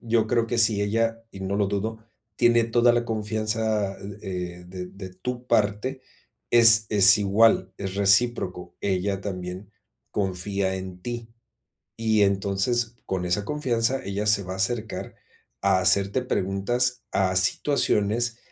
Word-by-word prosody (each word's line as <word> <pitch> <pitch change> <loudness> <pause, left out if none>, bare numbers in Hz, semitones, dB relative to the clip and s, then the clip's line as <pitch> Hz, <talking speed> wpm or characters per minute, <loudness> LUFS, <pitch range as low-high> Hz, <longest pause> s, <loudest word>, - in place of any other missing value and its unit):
Yo 115 -1 0
creo 115 +1 0
que 120 0 -2
si 110 -2 +4
ella, 115 +2 -1
y 95 - -11
no 95 +1 -3
lo 105 - +1
dudo, 110 +3 -4 0.3
tiene 120 -1 +3
toda 120 +1 +3
la 120 0 0
confianza, 110 -2 -2
eh 100 +1 -10 0.4
eh, - - -15
de 90 0 -7
de 95 0 -10
tu 125 +7 -7
parte, 110 +5 0 0.5
es 110 -2 +7
es 100 -2 +7
igual, 100 -1 +2
es 95 -1 -5
recíproco, 100 -3 +1
ella 95 0 -1
también 95 0 -7 0.4
confía 95 0 -2
en 95 -1 -8
ti. 120 -1 -6 0.7
Y 110 -2 +1
entonces, 100 +4 0
con 95 -2 -3
esa 90 +3 -1
confianza 130 -3 -1
ella 100 +2 -3
se 105 -2 +3
va 90 - -6
a - - -6
acercar 110 +3 -3 0.5
a 95 -1 +2
hacerte 100 +5 +2
preguntas 120 +3 -1
a 95 -1 0
situaciones, 115 +3 +1
105 Hz, 145 wpm, -24 LUFS, 95-115 Hz, 0.7 s, es